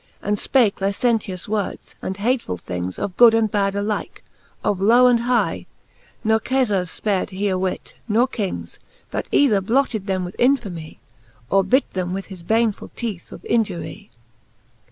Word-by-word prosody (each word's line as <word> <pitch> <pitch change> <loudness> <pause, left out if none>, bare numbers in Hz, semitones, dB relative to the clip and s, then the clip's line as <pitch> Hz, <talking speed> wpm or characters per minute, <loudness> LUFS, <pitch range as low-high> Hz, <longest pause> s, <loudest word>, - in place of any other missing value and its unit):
And 205 +1 -1
fpake 225 -4 +2
licentious 200 -2 0
words, 210 -2 -3
and 190 - -4
hatefull 220 - -1
things 90 +1 -4
Of 185 - -4
good 235 -2 +8
and 220 -2 +2
bad 200 -1 +1
alike, 205 +1 -3 0.4
of 195 -2 0
low 235 +5 +6
and 245 -1 +5
hie; 240 +1 0 0.6
Ne 220 0 +3
Kefars 215 -7 0
fpared 200 -4 0
he 200 +1 -1
a 190 - +1
whit, 185 0 -3
nor 230 +3 +3
Kings, 210 -7 -5 0.3
But - - -3
either 220 -9 +4
blotted 220 -1 0
them 185 -2 -1
with 175 - -8
infamie, 210 - 0 0.5
Or 195 0 +4
bit 255 +9 +2
them 180 -1 -2
with 195 +1 -4
his 180 - -9
baneful! 220 +4 0
teeth 215 -7 -5
of - - -11
injury. 205 - -2
205 Hz, 155 wpm, -22 LUFS, 190-235 Hz, 0.6 s, good